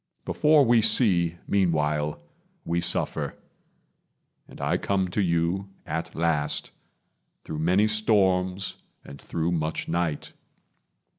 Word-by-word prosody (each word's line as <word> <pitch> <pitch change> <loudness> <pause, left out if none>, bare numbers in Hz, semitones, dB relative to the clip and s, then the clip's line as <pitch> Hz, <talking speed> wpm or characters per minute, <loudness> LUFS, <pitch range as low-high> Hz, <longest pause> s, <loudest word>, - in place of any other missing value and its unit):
Before 150 -2 +4
we 120 -1 +4
see, 85 -8 +3
Meanwhile, 75 -6 0 0.5
we 85 +1 0
suffer; - - 0 1.1
and - - -14
I - - 0
come 95 -2 -1
to 100 +4 -1
you, 85 +2 0 0.2
At 80 +1 -4
last, 80 -3 0 0.7
through 75 - -6
many 90 +6 +3
storms 95 -3 +1 0.3
and 70 0 -11
through 85 +1 -2
much 80 -2 -2
night. 85 -3 -2
85 Hz, 105 wpm, -26 LUFS, 80-100 Hz, 1.1 s, Before